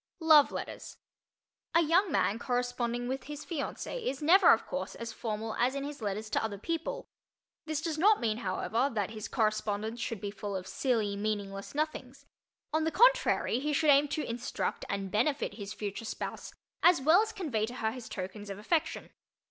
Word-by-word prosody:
LOVE 310 -3 +7
LETTERS - - -6 0.8
A 335 - +7
young 340 +4 +3
man 220 -4 +1
corresponding 245 -1 -1
with 260 +1 -3
his 295 +1 -7
fiancée 350 - -4
is 270 -6 -2
never, 345 +6 +7
of - - +3
course, - - -4
as 230 -1 -6
formal 220 -1 -4
as 250 +3 +2
in 275 - -2
his 285 -2 -6
letters 210 +1 -3
to - - +1
other 215 -2 -3
people. 335 - -3 0.6
This 310 -1 -1
does 320 -2 -2
not 415 +5 +5
mean, 220 -2 0
however, 230 +5 0
that 210 -3 -2
his 215 -2 -6
correspondence 215 0 -1
should 230 -4 -3
be 200 +1 -4
full 200 0 -5
of 185 -1 -4
silly 220 -2 0
meaningless 200 +1 -3
"nothings." 290 -4 -3 0.5
On 315 0 +2
the 320 - +2
contrary, 480 - +4
he 300 +2 -1
should 295 +1 +4
aim 285 +1 +5
to 295 +1 -2
instruct 235 +1 -3
and 195 -1 -3
benefit 250 +2 +1
his 200 -1 -7
future 210 +2 -5
spouse - - -5 0.3
as 350 -3 +6
well 315 +8 +5
as 445 0 -2
convey 255 - -2
to 245 - -7
her 220 -3 -1
his 240 -1 -8
tokens 200 +2 -6
of 195 - -5
affection. 310 +10 -1
245 Hz, 185 wpm, -31 LUFS, 215-305 Hz, 0.8 s, LOVE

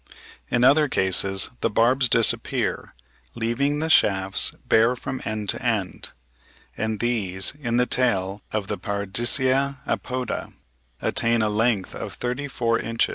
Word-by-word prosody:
In 120 0 +1
other 145 +4 +5
cases 95 0 +1
the - - 0
barbs 125 +4 +3
disappear, 115 -1 0 0.4
leaving 120 +6 0
the 160 +2 -2
shafts 95 -6 +3 0.2
bare 115 +3 +4
from 130 +1 -5
end 110 -1 -3
to - - 0
end; 110 -6 -2 0.7
and 110 -1 -2
these 100 -6 0
in 120 -2 -1
the 125 - +3
tail 100 -6 0
of 105 -2 -2
the - - -4
Paradisea 120 +7 +1
apoda 125 -2 -3 0.5
attain 115 -1 +2
a 105 - +1
length 110 -2 0
of - - -6
thirty 125 +4 -3
four 115 -3 0
inches 115 0 0
(71. - - -8
115 Hz, 140 wpm, -23 LUFS, 105-125 Hz, 0.7 s, other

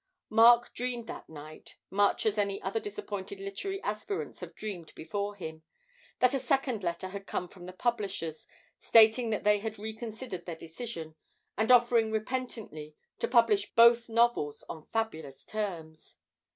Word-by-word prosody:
Mark 235 +2 +6
dreamed 245 -1 -3
that - - -8
night 155 0 -11 0.2
much 200 +1 +2
as 215 -1 +1
other 200 +1 -1
disappointed 200 -2 -6
literary 200 - -4
aspirants 215 - -4
have - - -9
dreamed 190 -6 -6
before 200 +5 -4
him 160 -5 -7 0.6
that 250 +1 +4
a 270 - +1
second 265 -6 0
letter 175 +2 -2
had 195 +1 -8
come 180 - -3
from 180 -1 -12
the - - -6
publishers, 195 -8 -2 0.3
stating 225 +1 +6
that 215 - -1
they 210 0 +4
had 220 +1 -5
reconsidered 220 -2 -6
their 170 - -4
decision, 165 0 -7 0.4
and 220 +4 +2
offering 235 -2 +5
repentantly 220 - -4 0.2
to - - 0
publish 230 -4 +3
both 235 0 +6
novels 230 -11 +2
on 155 -1 -8
fabulous 160 -12 -3
terms. 170 -7 -5
210 Hz, 145 wpm, -30 LUFS, 180-235 Hz, 0.6 s, Mark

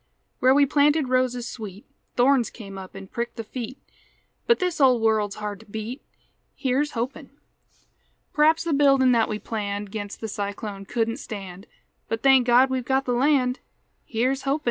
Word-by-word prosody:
Where 260 +1 +5
we 285 0 +6
planted 290 0 +2
roses 250 -1 +1
sweet 210 -4 -8 0.3
Thorns 250 -1 +3
come 200 -4 -10
up 190 0 -11
an' 195 0 -8
pricked 235 +4 -5
the 225 - -5
feet; 245 +3 -6 0.7
But 470 - +5
this 360 -4 -1
old 255 -3 +5
world's 215 -2 +2
hard 210 -2 -5
to - - -17
beat, 220 +5 -6 0.5
Here's 280 +2 0
hopin'! 260 +4 -4 1.0
P'r'aps 310 +2 +4
the 335 -2 -1
buildin' 275 -2 +4
that 230 -2 +3
we 215 - -2
planned 205 -2 -4
'Gainst 205 -1 -6
the 220 - -4
cyclone 200 -1 -5
couldn't 230 +1 -1
stand; 195 -1 -8 0.4
But, 225 0 -3
thank 265 -2 +5
God 250 +2 +5
we've 260 -1 -1
got 265 +2 0
the 250 - -1
land, 255 0 +2 0.4
Here's 255 +4 -1
hopin'! 275 +2 0
245 Hz, 165 wpm, -24 LUFS, 215-270 Hz, 1.0 s, we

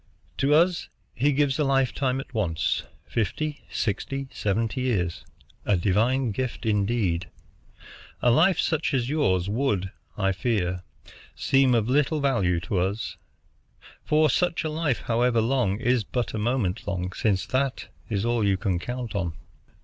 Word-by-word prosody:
To 135 +2 +2
us 175 +2 +2 0.2
He 140 +5 +2
gives 140 0 +1
a - - +3
lifetime 135 -1 +1
at 135 - -9
once, 90 -6 0 0.2
fifty, 150 +7 -2
sixty, 135 +5 -2
seventy 110 +4 -1
years, 95 -10 -1 0.4
a 100 - +2
divine 115 +7 +2
gift 125 +2 -3
indeed. 100 -4 0 0.9
A 120 - +3
life 170 +9 +4
such 160 -3 +1
as 125 -1 0
yours 95 - +1
would, 105 -5 0 0.3
I 95 -2 +2
fear, 90 -3 -1 0.5
seem 135 -2 +3
of 110 -2 +1
little 145 +4 +2
value 100 -12 +2
to 90 +2 -1
us; 100 +5 -2 0.9
for 155 +1 +3
such 170 +5 +1
a 155 - -2
life, 155 -5 0
however 120 0 +2
long, 115 -4 +1
is 125 -2 +2
but 120 +2 -3
a 110 - -2
moment 110 -4 -1
long, 90 -1 -2
since 95 -3 0
that 130 +3 -1 0.2
is 105 -1 -1
all 120 -1 +1
you 100 -2 +2
can 95 -3 -1
count 120 +3 -5
on." 90 -5 -2
120 Hz, 150 wpm, -26 LUFS, 100-135 Hz, 0.9 s, life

